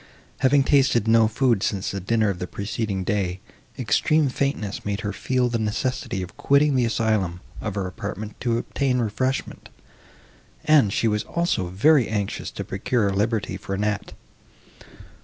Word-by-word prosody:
Having 135 Hz, +1 st, +4 dB
tasted 135 Hz, -6 st, +3 dB
no 115 Hz, 0 st, +5 dB
food 115 Hz, -2 st, +1 dB
since 100 Hz, -2 st, -1 dB
the 100 Hz, -, -3 dB
dinner 110 Hz, +2 st, +1 dB
of 90 Hz, -, -7 dB
the 90 Hz, -, -4 dB
preceding 100 Hz, -1 st, -3 dB
day, 95 Hz, -2 st, -1 dB, 0.4 s
extreme 155 Hz, -2 st, +2 dB
faintness 130 Hz, -7 st, -2 dB
made 100 Hz, +1 st, -2 dB
her 105 Hz, -3 st, -3 dB
feel 125 Hz, +4 st, 0 dB
the 120 Hz, -1 st, -1 dB
necessity 110 Hz, -2 st, -2 dB
of 90 Hz, -, -9 dB
quitting 140 Hz, +1 st, +3 dB
the 125 Hz, -2 st, +2 dB
asylum 110 Hz, -6 st, 0 dB, 0.2 s
of 105 Hz, -3 st, -4 dB
her 100 Hz, -2 st, -1 dB
apartment 105 Hz, +2 st, -6 dB
to 120 Hz, -2 st, 0 dB
obtain 130 Hz, +1 st, -1 dB
refreshment, 125 Hz, +4 st, -2 dB, 1.0 s
and 150 Hz, -10 st, +5 dB
she 115 Hz, -, +1 dB
was 105 Hz, -1 st, +1 dB
also 170 Hz, -, -1 dB
very 120 Hz, -, +4 dB
anxious 105 Hz, -2 st, -3 dB
to -, -, -6 dB
procure 100 Hz, +1 st, 0 dB
liberty 105 Hz, -1 st, -1 dB
for 95 Hz, 0 st, -5 dB
Annette. 105 Hz, 0 st, -2 dB
110 Hz, 155 wpm, -24 LUFS, 100-130 Hz, 1.0 s, no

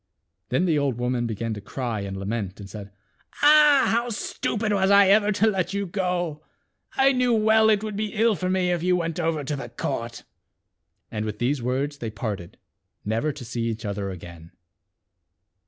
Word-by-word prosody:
Then 130 Hz, +9 st, +1 dB
the 160 Hz, -4 st, +2 dB
old 135 Hz, -4 st, 0 dB
woman 120 Hz, -1 st, -1 dB
began 115 Hz, 0 st, -3 dB
to 105 Hz, -, -7 dB
cry 120 Hz, +1 st, -4 dB
and 100 Hz, -1 st, -5 dB
lament 100 Hz, -1 st, -4 dB
and 100 Hz, -, -8 dB
said, 100 Hz, 0 st, -9 dB, 0.3 s
" -, -, -17 dB
Ah! 295 Hz, -2 st, +7 dB
how 235 Hz, +1 st, +1 dB
stupid 215 Hz, 0 st, -2 dB
was 190 Hz, -1 st, +2 dB
I 200 Hz, -1 st, +6 dB
ever 210 Hz, +1 st, +4 dB
to 205 Hz, +2 st, +2 dB
let 195 Hz, -2 st, 0 dB
you 200 Hz, 0 st, -1 dB
go. 175 Hz, -4 st, -2 dB, 0.5 s
I 270 Hz, 0 st, +5 dB
knew 250 Hz, -2 st, +2 dB
well 220 Hz, 0 st, +4 dB
it 210 Hz, -1 st, +2 dB
would 215 Hz, -2 st, -4 dB
be 210 Hz, 0 st, -3 dB
ill 225 Hz, +1 st, +3 dB
for 185 Hz, +1 st, -2 dB
me 185 Hz, -1 st, +1 dB
if 175 Hz, -2 st, 0 dB
you 180 Hz, +1 st, +2 dB
went 165 Hz, -1 st, -2 dB
over 160 Hz, -3 st, 0 dB
to 145 Hz, +2 st, -3 dB
the 135 Hz, -, -7 dB
court." -, -, -4 dB, 0.9 s
And 105 Hz, -1 st, -3 dB
with 105 Hz, -1 st, -4 dB
these 125 Hz, +4 st, 0 dB
words 135 Hz, +4 st, -2 dB
they 115 Hz, -, -4 dB
parted, 100 Hz, -4 st, -5 dB, 0.5 s
never 115 Hz, +8 st, 0 dB
to 140 Hz, -3 st, -9 dB
see 115 Hz, 0 st, -3 dB
each 115 Hz, -1 st, -3 dB
other 100 Hz, -1 st, -3 dB
again. 85 Hz, -2 st, -10 dB
150 Hz, 190 wpm, -24 LUFS, -, 0.9 s, Ah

